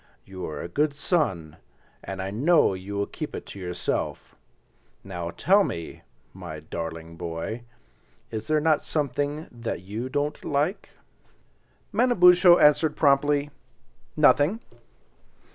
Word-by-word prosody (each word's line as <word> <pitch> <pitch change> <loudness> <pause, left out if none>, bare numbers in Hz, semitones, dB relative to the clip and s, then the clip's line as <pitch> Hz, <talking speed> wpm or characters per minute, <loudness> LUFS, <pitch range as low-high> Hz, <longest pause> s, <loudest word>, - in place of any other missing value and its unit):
"You 95 -1 -7
are 75 - -6
a - - -5
good 145 - 0
son, 115 - -1 0.5
and 95 -1 -5
I 95 - -4
know 145 - +3
you 95 +2 -7
will 100 - 0
keep - - -7
it - - -7
to 100 - -10
yourself. 90 -1 -3 0.7
Now 90 -3 -5
tell 195 - +3
me, 85 - -5 0.3
my 85 -4 -8
darling 80 +1 -6
boy, 85 +8 -5 0.7
is 110 0 -5
there 155 0 +2
not 155 0 +2
something 145 +1 -2
that 115 -6 -5
you 110 +7 -5
don't 145 +2 -2
like?" 150 +8 -1 1.0
Manabozho 180 -6 +6
answered 150 +1 +4
promptly—"Nothing." 145 +4 +1
130 Hz, 120 wpm, -25 LUFS, 90-150 Hz, 1.0 s, Manabozho